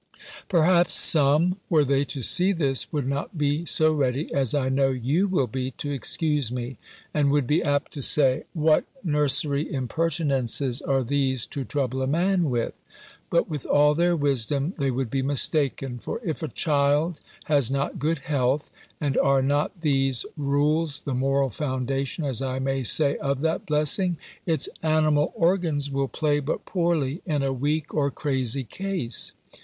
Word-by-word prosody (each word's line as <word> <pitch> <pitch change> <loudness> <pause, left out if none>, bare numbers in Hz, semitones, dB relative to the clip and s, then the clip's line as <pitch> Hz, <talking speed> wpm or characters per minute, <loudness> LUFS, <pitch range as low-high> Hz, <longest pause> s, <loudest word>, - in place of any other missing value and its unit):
Perhaps 175 0 +3
some, 155 +5 +5
were 155 -4 +3
they 140 +1 +1
to 135 -1 -6
see 185 - +4
this, 140 -7 0
would 145 -4 -2
not 140 +5 -4
be 150 +3 0
so 155 0 +3
ready, 140 0 -1
as 135 -1 +1
I 135 -3 0
know 135 +1 +2
you 135 +9 0
will 180 -9 +1
be, 130 +2 -4
to 145 - -3
excuse 145 -1 0
me; 125 0 -5 0.4
and 145 -2 +2
would 145 -1 +2
be 150 +7 +1
apt 145 -1 -1
to 145 - -6
say, 135 -1 +4
"What 155 -1 +3 0.2
nursery 145 -1 +2
impertinences 135 -2 0
are 135 -1 0
these 130 -1 0
to 140 - -3
trouble 130 -1 -2
a 130 - -1
man 175 +2 +1
with!" 120 -2 -1 0.6
But 170 - +1
with 150 -4 -6
all 150 +1 +4
their 175 +2 +2
wisdom, 140 - 0
they 140 -1 +1
would 130 -2 -2
be 135 - 0
mistaken; 135 -2 0
for - - -5
if 160 -4 -3
a 160 - -2
child 150 +2 0 0.2
has 140 -6 +2
not 140 +1 -2
good 160 +4 0
health, 140 0 0 0.3
(and 145 -3 -1
are 135 -1 +3
not 145 +6 -1
these 135 -5 0
rules 150 +2 0
the 140 - -4
moral 135 +1 +1
foundation, 135 - -3
as 135 -3 -2
I 130 -1 -2
may 135 0 -1
say, 140 +4 +3
of 140 -2 -2
that 160 +1 -1
blessing?) 155 +4 0 0.3
its 160 -2 +2
animal 155 -1 +2
organs 165 -5 +1
will 135 0 -1
play 145 +1 0
but 145 +1 -4
poorly 170 -5 -1
in 150 -4 0
a 135 -1 0
weak 145 +4 -2
or 140 -2 +1
crazy 135 -2 -2
case. 185 -3 -3
145 Hz, 165 wpm, -24 LUFS, 135-155 Hz, 0.6 s, some